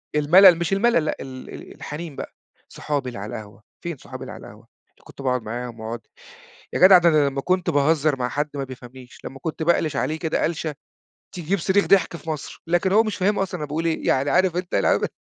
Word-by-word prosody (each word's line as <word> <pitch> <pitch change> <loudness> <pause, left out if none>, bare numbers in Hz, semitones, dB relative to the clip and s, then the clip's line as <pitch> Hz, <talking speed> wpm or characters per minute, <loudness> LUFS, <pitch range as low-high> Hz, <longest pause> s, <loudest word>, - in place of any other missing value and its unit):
الملل 175 +5 +7
مش 170 +3 -1
الملل 195 -5 +2
لأ، 155 - -1
ال 130 -1 -9
ال - - -10
الحنين 150 0 -7
بقى، - - -7 0.4
صحابي 145 -4 -3
اللي 120 - -8
على 105 +2 -6
القهوة، 105 -1 -10 0.2
فين 170 -3 -4
صحابي - - -10
اللي - - -7
على - - -11
القهوة؟ - - -15 0.3
اللي - - -28
كنت - - -13
باقعد 125 -2 0
معاهم، 120 +1 -6
واقعد 115 +1 -5 0.7
يا - - -1
جدع 185 0 +9
ده 175 -1 +4
أنا 150 -3 +3
لمّا 135 0 -4
كنت 185 +2 0
باهزر 150 0 +2
مع 125 0 -1
حد 145 +4 -2
ما 140 - -2
بيفهمنيش، 130 -1 -12
لمّا 135 - -8
كنت 160 0 -3
بألِش 160 -2 +1
عليه 155 +4 -1
كده 160 -2 0
ألشة 160 -2 -3 0.6
تجيب 180 +3 -1
صريخ 195 +4 +2
ضحك 180 -3 +3
في 165 - -9
مصر، 155 -3 -6
لكن 175 +3 +1
هو 215 +3 +5
مش 215 -2 -3
فاهم 205 +2 +1
أصلًا 190 -2 -2
أنا 150 - -4
باقول 155 +3 -3
إيه، 165 -1 -1
يعني 135 +2 +2
عارف 185 -1 +2
أنت 180 0 -4
العمل 100 - +2
155 Hz, 220 wpm, -23 LUFS, 135-175 Hz, 0.7 s, جدع